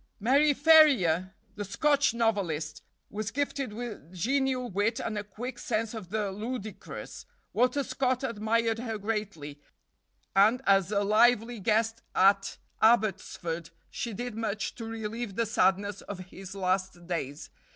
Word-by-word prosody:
Mary 275 +8 +4
Ferrier, 270 - +5 0.2
the 205 - -5
Scotch 285 +8 +2
novelist, 190 -10 -1 0.3
was 215 +1 -3
gifted 275 0 -2
with 215 -8 -7
genial 255 +6 0
wit 205 +3 0
and 225 - -3
a 210 - -2
quick 240 +5 -7
sense 225 -5 -2
of 215 -6 -7
the 210 -1 -1
ludicrous. 215 0 -7 0.3
Walter 255 +3 +2
Scott 255 -1 -1
admired 225 -1 0
her 225 -2 -3
greatly, 195 -9 -4 0.7
and 215 +6 +5
as 195 -1 +4
a 205 -1 +2
lively 230 +2 +3
guest 225 +3 +1
at 195 +1 +3 0.2
Abbotsford 195 -7 +1 0.2
she 235 - -4
did 245 +3 -5
much 215 -2 -3
to 230 - -7
relieve 225 -1 -5
the 230 - +1
sadness 200 -1 +1
of 205 - -7
his 195 0 -9
last 185 -2 -1
days. 155 -5 -4
215 Hz, 135 wpm, -29 LUFS, 195-240 Hz, 0.7 s, Ferrier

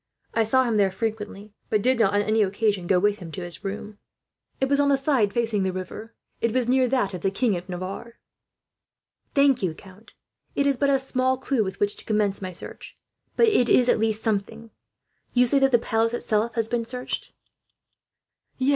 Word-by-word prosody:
I 225 - +2
saw 260 +4 +3
him 230 -3 0
there 200 -2 +4
frequently, 210 0 -5 0.2
but 210 -2 +1
did 255 -1 +3
not, 205 -3 +3
on 205 - +3
any 215 +1 +2
occasion, 200 -2 0
go 185 - +4
with 205 +2 +1
him 170 -3 -9
to 185 - -5
his 175 +3 -5
room." 210 +1 -6 0.6
"It 265 - +1
was 280 +1 +2
on 285 0 +3
the 275 - +4
side 270 -7 +2
facing 225 -3 0
the 190 0 0
river. 185 +5 -7 0.2
It 230 - 0
was 250 0 0
near 255 0 +3
that 245 -6 0
of 180 - -5
the 195 - +1
King 205 +2 0
of 180 +2 -7
Navarre." 185 +6 -6 1.2
"Thank 280 -2 +4
you, 175 -5 -1
count. 195 +5 -16 0.4
It 280 - +1
is 280 -1 +3
but 280 +3 +1
a 275 - +4
small 260 -1 0
clue 260 -3 0
with 190 -1 -6
which 205 0 +1
to - - -14
commence 210 -2 0
my 185 -1 -4
search, 175 - -8 0.4
but 465 - +4
it 250 - +3
is 250 - +5
at - - +3
least 220 0 0
something. 225 +1 -2 0.6
You 250 0 +5
say 275 +3 +2
that 270 0 +4
the 240 - +6
palace 230 0 0
itself 220 0 0
has 225 -2 0
been 240 0 -1
searched?" 250 +2 -5 1.2
"Yes. 260 +1 +1
225 Hz, 210 wpm, -24 LUFS, 200-255 Hz, 1.2 s, the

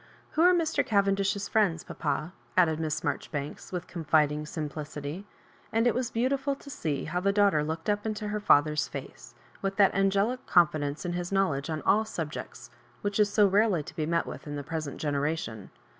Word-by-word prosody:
" - - -30
Who 315 - +1
are 355 +2 +7
Mr. 335 -3 +2
Cavendish's 200 -3 +1
friends, 190 -7 +2
papa? 165 +4 -3
" - - -29
added 160 -3 +4
Miss 155 -1 -2
Marjoribanks, 145 -1 -4
with 180 -1 -3
confiding 150 -3 +1
simplicity; 150 +3 -5 0.4
and 225 +1 +2
it 240 - +4
was 250 0 -1
beautiful 270 +4 0
to 280 - -12
see 150 - -2
how 175 +3 -1
the 200 +2 +2
daughter 200 -7 +3
looked 160 +1 -4
up 205 0 +1
into 215 -1 -3
her 210 0 -2
father's 150 -6 +3
face, 120 -3 -9 0.3
with 195 0 -2
that 200 -1 +5
angelic 200 +6 +1
confidence 155 -3 +2
in 175 - -2
his 175 +1 -3
knowledge 170 -7 +1
on 155 -1 -3
all 215 +2 +4
subjects 165 -8 -6 0.3
which 205 0 -1
is 205 -1 +4
so 210 0 +5
rarely 200 -4 +3
to - - -11
be 155 -1 -1
met 170 0 +1
with - - -8
in 145 - -4
the 145 - -4
present 155 -1 -4
generation. 145 -7 -2
175 Hz, 190 wpm, -28 LUFS, 150-205 Hz, 0.4 s, are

